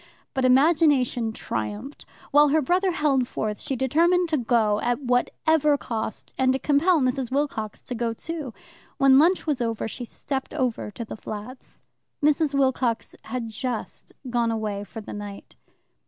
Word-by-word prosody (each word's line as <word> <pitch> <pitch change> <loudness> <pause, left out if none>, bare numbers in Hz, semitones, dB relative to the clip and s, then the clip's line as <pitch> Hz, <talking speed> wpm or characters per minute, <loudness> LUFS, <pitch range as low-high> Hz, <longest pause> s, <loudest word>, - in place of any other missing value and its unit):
But 265 -1 0
imagination 265 -4 +3
triumphed. 210 - -5 0.2
While 295 +1 +6
her 310 +2 +3
brother 365 +7 +2
held 285 -7 +1
forth 210 -3 -3
she 270 - -2
determined 335 +7 +2
to 310 - +1
go, 220 -3 +2
at 240 +1 0
whatever 290 +4 +2
cost, 225 -5 -5
and 260 0 +4
to - - +1
compel 305 +5 +3
Mrs. 255 -1 0
Wilcox 260 -6 -2
to - - -5
go, 235 -1 -1
too. 300 +3 -5 0.5
When 275 -1 +6
lunch 350 +5 +3
was 290 -5 -1
over 230 -2 -1
she 245 +2 -6
stepped 270 +4 -4
over 255 -7 -1
to 230 +3 -7
the - - -7
flats. 215 +5 -9 0.4
Mrs. 300 -1 +2
Wilcox 260 -4 0
had 230 0 -4
just 235 +1 -5 0.2
gone 240 -1 +1
away 215 -3 -2
for 225 - -8
the - - -8
night. 205 -1 -8
255 Hz, 155 wpm, -25 LUFS, 230-295 Hz, 0.5 s, While